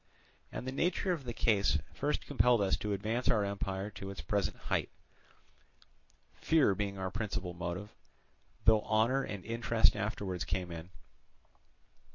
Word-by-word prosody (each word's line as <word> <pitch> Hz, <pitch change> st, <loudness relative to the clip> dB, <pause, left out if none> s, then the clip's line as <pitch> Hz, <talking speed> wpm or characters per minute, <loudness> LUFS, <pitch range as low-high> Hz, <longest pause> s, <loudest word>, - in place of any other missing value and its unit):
And -, -, -5 dB
the 130 Hz, -, -2 dB
nature 175 Hz, +6 st, +1 dB
of 160 Hz, -7 st, -2 dB
the 120 Hz, -, -3 dB
case 105 Hz, -3 st, +3 dB, 0.2 s
first -, -, -1 dB
compelled 120 Hz, +2 st, +4 dB
us 95 Hz, -2 st, +2 dB
to 105 Hz, -, -3 dB
advance 110 Hz, +5 st, -1 dB
our 105 Hz, -2 st, +3 dB
empire 100 Hz, 0 st, -3 dB
to 100 Hz, -1 st, -7 dB
its 100 Hz, -, -7 dB
present 100 Hz, +6 st, -1 dB
height; -, -, -1 dB, 1.4 s
fear 155 Hz, -10 st, +3 dB
being 100 Hz, 0 st, -2 dB
our 95 Hz, -1 st, -3 dB
principal 100 Hz, -5 st, -3 dB
motive, 90 Hz, +4 st, -5 dB, 0.7 s
though 110 Hz, -1 st, +6 dB
honour 115 Hz, +6 st, +2 dB
and 100 Hz, -7 st, -5 dB
interest 115 Hz, 0 st, +3 dB
afterwards 100 Hz, -4 st, -2 dB
came 90 Hz, +4 st, -2 dB
in. 85 Hz, +1 st, -7 dB
105 Hz, 145 wpm, -33 LUFS, 95-115 Hz, 1.4 s, though